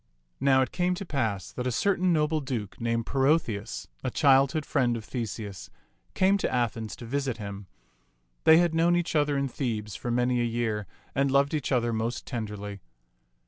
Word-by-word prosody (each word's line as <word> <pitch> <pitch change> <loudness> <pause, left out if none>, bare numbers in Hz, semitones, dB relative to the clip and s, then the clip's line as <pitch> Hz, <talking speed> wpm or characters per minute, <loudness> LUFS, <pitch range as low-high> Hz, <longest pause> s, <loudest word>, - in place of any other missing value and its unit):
Now 135 -1 +4
it - - -5
came 180 0 0
to 195 +2 -6
pass 110 - -2
that 125 0 -3
a - - 0
certain 185 - +2
noble 155 -1 +2
duke 120 -8 -5
named 115 -1 0
Perotheus, 135 -7 0 0.2
a - - 0
childhood's 140 +2 +3
friend 125 -5 +1
of 110 - -8
Theseus, 105 -7 -5 0.5
came 195 +2 +3
to - - -1
Athens 115 -3 -1
to 120 - -10
visit 135 0 -2
him; 100 -2 -7 0.8
they 160 0 +8
had 170 -1 +3
known 170 +2 +3
each 175 -1 -1
other 145 -1 +2
in 140 0 0
Thebes 110 -6 -3
for 120 - -5
many 125 +1 +1
a - - +2
year, 115 -3 -1 0.3
and 140 0 +2
loved 140 +2 +3
each 150 -3 -1
other 120 -2 +2
most 115 +2 -2
tenderly. 105 -4 -5
125 Hz, 180 wpm, -27 LUFS, 110-145 Hz, 0.8 s, they